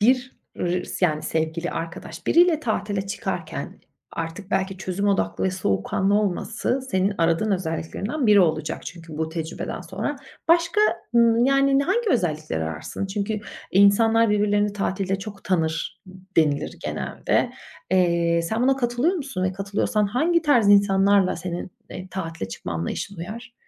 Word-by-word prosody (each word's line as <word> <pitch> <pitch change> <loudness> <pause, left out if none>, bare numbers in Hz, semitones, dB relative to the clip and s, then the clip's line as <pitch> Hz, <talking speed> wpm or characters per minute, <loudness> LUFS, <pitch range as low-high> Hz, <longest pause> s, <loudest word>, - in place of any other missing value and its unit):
bir 255 +3 +2 0.2
r 180 +1 -1
s 180 - +1
yani, 155 -2 -2
sevgili, 160 +2 -2
arkadaş, 170 0 -6
biriyle 340 -2 +5
tatile 205 -6 -2
çıkarken 195 - -5 0.3
artık 170 +4 -5
belki 190 0 0
çözüm 190 +2 -1
odaklı 200 - 0
ve 190 - +2
soğukkanlı 185 - 0
olması 215 +5 0
senin 190 +2 +1
aradığın 165 +5 +2
özelliklerinden 190 - -2
biri 210 -2 +7
olacak 155 -3 0
çünkü 165 -3 -9
bu 160 0 -1
tecrübeden 160 0 -5
sonra. 195 - -4 0.3
Başka, 335 +4 +4 0.4
ımm, 235 0 +5
yani, 275 +1 +4
hangi 430 +5 +1
özellikleri 155 - 0
ararsın? 80 - -4
Çünkü 205 +2 -2 0.3
insanlar 220 +3 +5
birbirlerini 205 0 +2
tatilde 195 -1 -1
çok 200 0 -9
tanır 165 0 -1 0.3
denilir, 150 -2 +2
genelde. - - -1 0.4
Eee, 170 -2 +3
sen 220 +8 -1
buna 265 +1 +3
katılıyor 245 +7 +1
musun 270 - -3
ve 185 - 0
katılıyorsan 200 +2 0
hangi 320 +11 +2
tarz 245 -9 +4
insanlarla 200 -1 +4
senin, 175 +1 -5 0.2
eee, 185 +1 -7
tatile 165 - -5
çıkma 95 -2 -6
anlayışın 85 - -4
uyar? 220 +8 -7
195 Hz, 140 wpm, -24 LUFS, 170-225 Hz, 0.4 s, biri